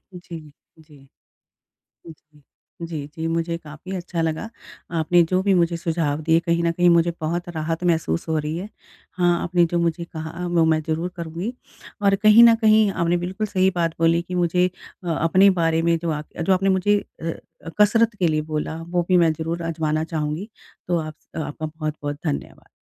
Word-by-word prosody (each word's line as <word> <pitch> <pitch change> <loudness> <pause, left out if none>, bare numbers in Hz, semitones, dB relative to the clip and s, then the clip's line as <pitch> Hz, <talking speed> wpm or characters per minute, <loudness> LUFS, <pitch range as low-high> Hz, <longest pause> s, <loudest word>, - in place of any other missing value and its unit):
जी, 175 -2 -8 0.4
जी। 155 -2 -18 1.1
हुँ, 165 - -8 0.2
हुँ। 150 - -21 0.4
जी, 155 -4 -5
जी। 160 0 -4
मुझे 165 +1 -1
काफ़ी 155 +4 -9
अच्छा 175 -1 -3
लगा 160 +7 -2 0.5
आपने 170 +2 +4
जो 185 +1 +2
भी 200 0 +2
मुझे 170 -1 +2
सुझाव 160 -3 -1
दिए। 165 +1 +3
कहीं 170 0 0
न 170 - +2
कहीं 175 +1 +3
मुझे 170 0 +3
बहुत 170 +3 -2
राहत 165 +1 -3
महसूस 160 - 0
हो 160 - +1
रही 150 +1 -3
है। 195 - -6 0.4
हाँ, 175 -1 +1
आपने 175 0 +2
जो 175 +1 -1
मुझे 170 0 0
कहा 165 +2 -6
वो 175 -2 +2
मैं 160 -1 +3
ज़रूर 165 +3 -1
करूँगी। 170 +6 -4 0.5
और 200 -1 +4
कहीं 215 +2 +8
न 230 -1 +8
कहीं 215 -1 +5
आपने 170 -1 +1
बिल्कुल 185 +5 -3
सही 190 -2 +2
बात 165 -1 0
बोली 165 +1 +3
कि 180 +1 -7
मुझे 180 +1 +2 0.3
अ, 175 - -4
अपने 175 +5 +4
बारे 165 0 +2
में 170 0 +2
जो 170 0 -3
आप 150 0 -4
जो 190 - +2
आपने 195 +1 +1
मुझे 205 +2 +3 0.2
अ, 165 0 -2 0.5
कसरत 225 +2 +4
के 175 - +2
लिए 155 -1 0
बोला 155 +1 -2
वो 175 0 +1
भी 185 - +4
मैं 165 -2 +4
ज़रूर 165 +2 -4
आज़माना 160 -1 -1
चाहूँगी। 160 +5 -3 0.4
तो 175 -1 +2
आप 155 -1 -5 0.2
आपका 155 0 -4
बहुत-बहुत 155 -2 -5
धन्यवाद। 150 - -4
170 Hz, 185 wpm, -22 LUFS, 160-180 Hz, 1.1 s, कहीं